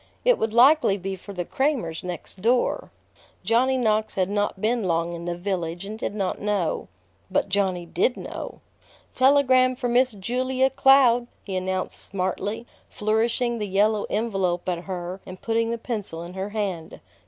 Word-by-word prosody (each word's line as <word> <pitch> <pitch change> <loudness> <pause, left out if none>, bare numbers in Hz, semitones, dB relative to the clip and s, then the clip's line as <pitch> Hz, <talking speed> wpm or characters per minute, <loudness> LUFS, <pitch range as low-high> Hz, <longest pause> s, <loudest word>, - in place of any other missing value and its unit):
It - - +4
would 220 - 0
likely 250 -2 +5
be 195 0 -4
for 190 +2 -11
the 180 -3 -4
Cramers 260 - -1
next 180 +1 -6
door. 240 +4 +1 0.5
Johnny 260 +3 +2
Knox 220 -3 +1
had 190 0 0
not 205 -1 -1
been 225 +1 0
long 170 -1 0
in 170 0 -6
the 175 0 -3
village, 175 -1 -3
and 215 +2 -7
did 205 - -3
not 195 -3 -2
know. 200 -5 -1 0.4
But 195 +1 0
Johnny 190 -3 0
did 180 +9 0
know. - - -7 0.5
"Telegram 260 -1 +4
for 250 -1 -2
Miss 250 +1 +3
Julia 255 +6 0
Cloud!" 255 -3 +5 0.2
he 195 - -5
announced 185 0 -2
smartly, 200 +4 -3 0.2
flourishing 230 +3 0
the 210 - -2
yellow 205 +2 +2
envelope 195 -6 -1
at 175 -1 -2
her 185 0 -5
and 185 0 -10
putting 230 0 0
the 235 - -1
pencil 210 -8 -4
in 175 +1 -9
her 190 +2 -4
hand. 195 -6 -4
205 Hz, 165 wpm, -24 LUFS, 185-240 Hz, 0.5 s, likely